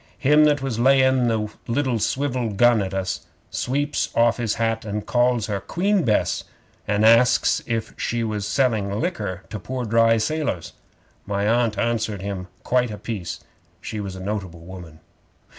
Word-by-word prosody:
'Him 150 Hz, +2 st, +5 dB
that 145 Hz, -2 st, +2 dB
was 125 Hz, -4 st, -2 dB
laying 130 Hz, -1 st, +4 dB
the 110 Hz, -2 st, 0 dB, 0.2 s
liddle 125 Hz, -1 st, 0 dB
swivel 130 Hz, 0 st, -1 dB
gun 120 Hz, +2 st, +4 dB
at 95 Hz, -1 st, -3 dB
us 95 Hz, -2 st, -3 dB, 0.2 s
sweeps 145 Hz, +4 st, -1 dB
off 115 Hz, 0 st, +3 dB
his 115 Hz, -3 st, -1 dB
hat 115 Hz, -1 st, -1 dB
an' 105 Hz, 0 st, -4 dB
calls 120 Hz, -1 st, +1 dB
her 105 Hz, -2 st, -2 dB
Queen 190 Hz, -, 0 dB
Bess, 110 Hz, -5 st, +1 dB, 0.4 s
and 105 Hz, +1 st, +2 dB
asks 115 Hz, +2 st, +5 dB
if 115 Hz, -1 st, -2 dB
she 120 Hz, 0 st, -1 dB
was 105 Hz, -2 st, -2 dB
selling 110 Hz, -7 st, 0 dB
liquor 155 Hz, -, -3 dB
to 105 Hz, -, -4 dB
pore 125 Hz, +5 st, -4 dB
dry 115 Hz, +1 st, +4 dB
sailors. 125 Hz, -, -2 dB, 0.5 s
My 100 Hz, 0 st, 0 dB
Aunt 115 Hz, -2 st, +2 dB
answered 110 Hz, -4 st, -1 dB
him 95 Hz, -2 st, -4 dB, 0.2 s
quite 125 Hz, -1 st, +1 dB
a 105 Hz, -, -6 dB
piece. 95 Hz, -6 st, -5 dB, 0.4 s
She 110 Hz, -, -6 dB
was 100 Hz, -2 st, -5 dB
a -, -, -8 dB
notable 95 Hz, -4 st, -4 dB
woman. 85 Hz, -3 st, -11 dB
115 Hz, 160 wpm, -23 LUFS, 100-125 Hz, 0.5 s, Him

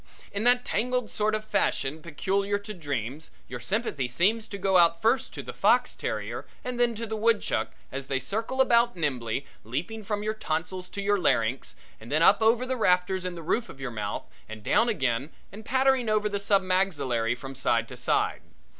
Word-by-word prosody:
In 205 Hz, +3 st, -1 dB
that 245 Hz, 0 st, +4 dB
tangled 250 Hz, +1 st, -1 dB
sort 215 Hz, 0 st, +1 dB
of 215 Hz, 0 st, -4 dB
fashion 155 Hz, -7 st, 0 dB
peculiar 195 Hz, +6 st, -1 dB
to 205 Hz, +1 st, -8 dB
dreams 145 Hz, -, -4 dB, 0.2 s
your 125 Hz, -, -6 dB
sympathy 145 Hz, -, -1 dB
seems 215 Hz, -, +1 dB
to 200 Hz, -, -6 dB
go 195 Hz, -1 st, +3 dB
out 170 Hz, -1 st, +5 dB
first 230 Hz, +6 st, +2 dB
to -, -, -5 dB
the -, -, -7 dB
fox -, -, +3 dB
terrier -, -, -4 dB, 0.2 s
and 250 Hz, -1 st, -4 dB
then 240 Hz, -1 st, +3 dB
to 230 Hz, +2 st, -3 dB
the 220 Hz, 0 st, -4 dB
woodchuck 225 Hz, 0 st, +1 dB, 0.2 s
as 135 Hz, 0 st, -5 dB
they 135 Hz, -1 st, 0 dB
circle 225 Hz, -, -1 dB
about 235 Hz, -3 st, +4 dB
nimbly, 130 Hz, -5 st, -2 dB, 0.2 s
leaping 165 Hz, -, -4 dB
from 205 Hz, 0 st, -2 dB
your 215 Hz, +1 st, 0 dB
tonsils 180 Hz, -2 st, -3 dB
to 200 Hz, -, -5 dB
your 205 Hz, 0 st, +2 dB
larynx 120 Hz, -6 st, +1 dB, 0.2 s
and 115 Hz, +4 st, -11 dB
then 155 Hz, +3 st, +3 dB
up 200 Hz, +5 st, +6 dB
over 230 Hz, +3 st, +4 dB
the 260 Hz, 0 st, -2 dB
rafters 180 Hz, -2 st, +2 dB
in 180 Hz, -1 st, -3 dB
the 165 Hz, -, -8 dB
roof 230 Hz, +9 st, 0 dB
of 135 Hz, -, -11 dB
your 135 Hz, -2 st, -4 dB
mouth 105 Hz, -2 st, -4 dB, 0.2 s
and 110 Hz, -1 st, -8 dB
down 235 Hz, -, +3 dB
again 135 Hz, -, 0 dB, 0.2 s
and 210 Hz, +3 st, -10 dB
pattering 260 Hz, -2 st, +2 dB
over 215 Hz, 0 st, +2 dB
the 205 Hz, -1 st, -2 dB
sub 200 Hz, -1 st, +3 dB
maxillary 145 Hz, -12 st, +1 dB
from 135 Hz, +2 st, -8 dB
side 120 Hz, -3 st, +1 dB
to -, -, -9 dB
side. -, -, 0 dB
195 Hz, 200 wpm, -27 LUFS, 135-220 Hz, 0.2 s, up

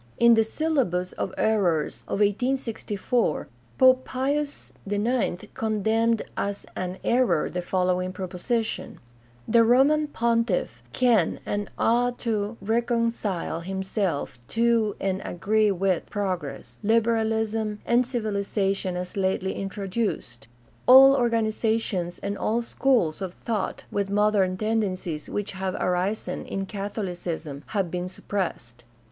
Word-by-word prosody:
In 235 Hz, 0 st, +6 dB
the 225 Hz, -1 st, +5 dB
Syllabus 220 Hz, -, 0 dB
of 190 Hz, -, -3 dB
Errors 170 Hz, -, +1 dB
of 205 Hz, -, -1 dB
1864 225 Hz, -, 0 dB, 0.3 s
Pope 260 Hz, 0 st, +6 dB
Pius 285 Hz, +3 st, -2 dB, 0.2 s
IX 205 Hz, -2 st, 0 dB
condemned 220 Hz, +1 st, +1 dB
as 200 Hz, 0 st, -3 dB
an 185 Hz, 0 st, -3 dB
error 235 Hz, -10 st, +2 dB
the 180 Hz, -, -2 dB
following 185 Hz, 0 st, 0 dB
proposition: 190 Hz, +5 st, -3 dB, 0.5 s
"The 230 Hz, +1 st, +5 dB
Roman 275 Hz, +6 st, +4 dB
Pontifif 230 Hz, -, 0 dB
can 225 Hz, -, +2 dB
and 205 Hz, -1 st, -2 dB
ought 245 Hz, +1 st, +2 dB
to 215 Hz, -1 st, -1 dB
reconcile 230 Hz, -6 st, 0 dB
himself 190 Hz, -, -2 dB
to 230 Hz, -2 st, +2 dB
and 190 Hz, -1 st, -1 dB
agree 210 Hz, +4 st, +1 dB
with 190 Hz, -2 st, 0 dB
progress, 175 Hz, -, -4 dB
liberalism, 220 Hz, -1 st, +1 dB
and 240 Hz, +1 st, +4 dB
civilization 200 Hz, -5 st, -1 dB
as 180 Hz, 0 st, -5 dB
lately 190 Hz, -1 st, 0 dB
introduced." 195 Hz, -, -3 dB, 0.4 s
All 270 Hz, +2 st, +10 dB
or 245 Hz, -3 st, +2 dB
ganizations 220 Hz, -5 st, 0 dB
and 200 Hz, 0 st, -2 dB
all 230 Hz, +2 st, 0 dB
schools 230 Hz, -10 st, +1 dB
of 185 Hz, -2 st, -4 dB
thought 215 Hz, -5 st, -3 dB
with 200 Hz, -1 st, -1 dB
modern 200 Hz, -2 st, +2 dB
tend 220 Hz, +2 st, +1 dB
encies 185 Hz, -6 st, -4 dB
which 205 Hz, -1 st, -3 dB
have 190 Hz, -1 st, -3 dB
arisen 180 Hz, +4 st, -1 dB
in 195 Hz, 0 st, -3 dB
Catholicism 180 Hz, -7 st, -4 dB
have 195 Hz, -5 st, -1 dB
been 180 Hz, 0 st, -3 dB
suppressed. 145 Hz, -12 st, -4 dB
205 Hz, 115 wpm, -25 LUFS, 185-230 Hz, 0.5 s, All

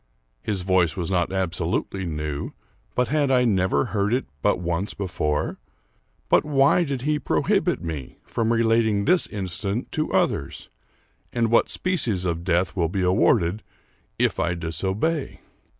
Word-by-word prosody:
His 100 Hz, -4 st, -2 dB
voice 90 Hz, -3 st, +2 dB
was 90 Hz, 0 st, -2 dB
not 90 Hz, -1 st, +1 dB
absolutely 90 Hz, 0 st, -2 dB
new, 75 Hz, -2 st, -4 dB, 0.4 s
but 125 Hz, -2 st, +1 dB
had 145 Hz, -1 st, +2 dB
I 125 Hz, -2 st, +4 dB
never 95 Hz, -9 st, +2 dB
heard 105 Hz, +2 st, +1 dB
it 130 Hz, -, -2 dB, 0.2 s
but -, -, +2 dB
once 85 Hz, +3 st, -2 dB
before? 75 Hz, -6 st, -2 dB, 0.7 s
But -, -, +4 dB
why 145 Hz, +3 st, +3 dB
did 135 Hz, -5 st, -3 dB
he 150 Hz, +1 st, +1 dB
prohibit -, -, +1 dB
me 75 Hz, -6 st, -6 dB
from 115 Hz, 0 st, -1 dB
relating 115 Hz, -3 st, +2 dB
this 180 Hz, -1 st, +3 dB
incident 100 Hz, +2 st, -3 dB
to 155 Hz, -, -1 dB
others, -, -, -1 dB, 0.6 s
and 115 Hz, -2 st, 0 dB
what 115 Hz, -, +4 dB
species 125 Hz, -, 0 dB
of 85 Hz, -1 st, -2 dB
death 90 Hz, +1 st, +1 dB
will 85 Hz, -4 st, +1 dB
be 95 Hz, +1 st, -1 dB
awarded 90 Hz, +1 st, +2 dB, 0.6 s
if -, -, +1 dB
I 85 Hz, +1 st, 0 dB
disobey? 95 Hz, -, -2 dB
95 Hz, 145 wpm, -24 LUFS, 85-120 Hz, 0.7 s, I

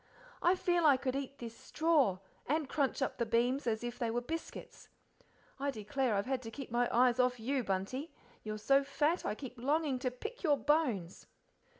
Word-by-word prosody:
I 350 Hz, +2 st, +4 dB
feel 350 Hz, -2 st, +1 dB
I 280 Hz, -3 st, +6 dB
could 260 Hz, 0 st, -2 dB
eat 275 Hz, 0 st, -4 dB
this 230 Hz, -1 st, -7 dB
straw, 295 Hz, -, +2 dB, 0.3 s
and 305 Hz, +1 st, 0 dB
crunch 275 Hz, -1 st, 0 dB
up -, -, -3 dB
the 235 Hz, -, +2 dB
beams 245 Hz, +4 st, +1 dB
as 220 Hz, 0 st, 0 dB
if 240 Hz, 0 st, -5 dB
they 235 Hz, -, 0 dB
were 235 Hz, +2 st, 0 dB
biscuits. 320 Hz, +7 st, -7 dB, 0.7 s
I 280 Hz, +1 st, 0 dB
declare 235 Hz, 0 st, -1 dB
I've 200 Hz, -, 0 dB
had 260 Hz, -1 st, -1 dB
to 225 Hz, -, -7 dB
keep 260 Hz, +1 st, -8 dB
my 240 Hz, +1 st, +2 dB
eyes 245 Hz, 0 st, +4 dB
off 250 Hz, -1 st, +2 dB
you, 260 Hz, +3 st, 0 dB
Bunty; 205 Hz, -, -2 dB, 0.3 s
you're 215 Hz, 0 st, -4 dB
so 275 Hz, +6 st, +3 dB
fat 295 Hz, +5 st, 0 dB
I 210 Hz, -, -1 dB
keep 250 Hz, -1 st, -9 dB
longing 285 Hz, +1 st, +1 dB
to 255 Hz, -, 0 dB
pick 435 Hz, -, -7 dB
your 295 Hz, -5 st, +3 dB
bones." 250 Hz, -, 0 dB
255 Hz, 195 wpm, -34 LUFS, 235-290 Hz, 0.7 s, I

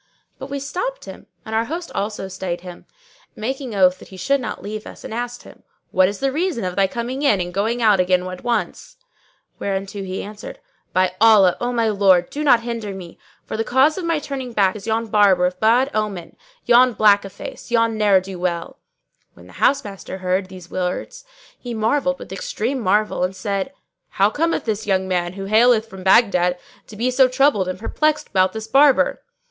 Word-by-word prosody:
But -, -, -8 dB
we 280 Hz, 0 st, -3 dB
stopped 430 Hz, -, -4 dB
him -, -, -11 dB, 0.2 s
and 220 Hz, -, -7 dB
our 225 Hz, +1 st, +1 dB
host 335 Hz, +6 st, -5 dB
also 200 Hz, -1 st, -3 dB
stayed 185 Hz, -2 st, -5 dB
him, 180 Hz, -1 st, -11 dB, 0.5 s
making 255 Hz, +1 st, -4 dB
oath 185 Hz, -1 st, +3 dB
that -, -, -13 dB
he 190 Hz, -, -12 dB
should 275 Hz, +9 st, +1 dB
not 220 Hz, -6 st, -6 dB
leave 210 Hz, +1 st, -6 dB
us -, -, -12 dB
and -, -, -7 dB
asked 245 Hz, +1 st, -5 dB
him, -, -, -15 dB, 0.3 s
"What 185 Hz, 0 st, +4 dB
is 200 Hz, -, -6 dB
the 270 Hz, 0 st, +1 dB
reason 320 Hz, -, -1 dB
of 180 Hz, -1 st, -3 dB
thy 195 Hz, -1 st, +3 dB
coming 240 Hz, +6 st, -4 dB
in 250 Hz, -9 st, +3 dB
and 180 Hz, 0 st, -4 dB
going 225 Hz, +5 st, -1 dB
out 210 Hz, -3 st, +4 dB
again 180 Hz, 0 st, +2 dB
at 185 Hz, 0 st, -7 dB
once?"; 245 Hz, -, -3 dB, 0.6 s
whereto 195 Hz, 0 st, -3 dB
he 190 Hz, 0 st, -5 dB
answered, 210 Hz, +1 st, -9 dB, 0.3 s
"By 185 Hz, 0 st, +1 dB
Allah, 210 Hz, -5 st, +6 dB
O 245 Hz, 0 st, -1 dB
my 230 Hz, -2 st, +1 dB
lord, 190 Hz, -4 st, +3 dB
do 300 Hz, -, -3 dB
not 255 Hz, -5 st, +5 dB
hinder 230 Hz, -4 st, -5 dB
me; 180 Hz, -3 st, -10 dB, 0.3 s
for -, -, -5 dB
the 225 Hz, -, -1 dB
cause 265 Hz, +6 st, +3 dB
of 375 Hz, -, -5 dB
my 335 Hz, -1 st, 0 dB
turning 270 Hz, -4 st, -5 dB
back 195 Hz, -3 st, +2 dB
is 210 Hz, +1 st, -9 dB
yon 225 Hz, +1 st, 0 dB
Barber 200 Hz, -4 st, +4 dB
of 180 Hz, 0 st, -2 dB
bad 245 Hz, +5 st, +3 dB
omen,[FN#602] 205 Hz, -5 st, -3 dB, 0.3 s
yon 245 Hz, +1 st, +5 dB
black 205 Hz, -1 st, +4 dB
o'face, 195 Hz, +4 st, -9 dB
yon 230 Hz, -1 st, +2 dB
ne'er 205 Hz, -3 st, +4 dB
do 185 Hz, -1 st, -8 dB
well!" 175 Hz, -1 st, -3 dB, 0.6 s
When -, -, -16 dB
the -, -, -16 dB
housemaster 205 Hz, -9 st, 0 dB
heard 185 Hz, +1 st, -1 dB
these 180 Hz, -2 st, -12 dB
words 185 Hz, -, -4 dB, 0.3 s
he 240 Hz, -2 st, -6 dB
marvelled 270 Hz, +5 st, 0 dB
with -, -, -9 dB
extreme -, -, -3 dB
marvel 210 Hz, -2 st, +1 dB
and 185 Hz, +1 st, -1 dB
said, 200 Hz, +4 st, -3 dB, 0.4 s
"How 200 Hz, +2 st, +2 dB
cometh 330 Hz, +7 st, -1 dB
this 220 Hz, -1 st, -3 dB
young 190 Hz, -1 st, +1 dB
man, 175 Hz, -1 st, -1 dB
who 195 Hz, 0 st, -6 dB
haileth 220 Hz, +2 st, +4 dB
from 190 Hz, -2 st, -11 dB
Baghdad, 185 Hz, -3 st, +3 dB, 0.3 s
to 215 Hz, -, -12 dB
be 240 Hz, +4 st, 0 dB
so 260 Hz, +1 st, +5 dB
troubled 255 Hz, -7 st, +2 dB
and 185 Hz, 0 st, -3 dB
perplexed 305 Hz, +9 st, -1 dB
about 185 Hz, -1 st, +2 dB
this 220 Hz, 0 st, -5 dB
Barber?" 280 Hz, -, +4 dB
215 Hz, 200 wpm, -20 LUFS, 190-245 Hz, 0.6 s, Allah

